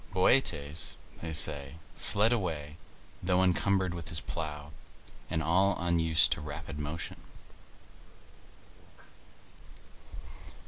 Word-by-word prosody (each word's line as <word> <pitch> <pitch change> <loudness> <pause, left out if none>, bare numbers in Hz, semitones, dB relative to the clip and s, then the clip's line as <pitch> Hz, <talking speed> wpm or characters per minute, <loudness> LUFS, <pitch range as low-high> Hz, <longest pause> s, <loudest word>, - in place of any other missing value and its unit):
Bootes, 80 - +1 0.2
they 80 - -4
say, 75 -2 +2 0.2
fled 105 +4 +2
away, 80 -9 -3 0.5
though 90 +1 +2
encumbered 95 0 +2
with 85 -2 -7
his 80 - 0
plough, 75 +2 -5 0.6
and 80 - -1
all 95 +5 +3
unused 80 -2 +3
to - - 0
rapid 75 +1 -7
motion. 75 +3 -5
80 Hz, 90 wpm, -30 LUFS, 75-90 Hz, 0.6 s, all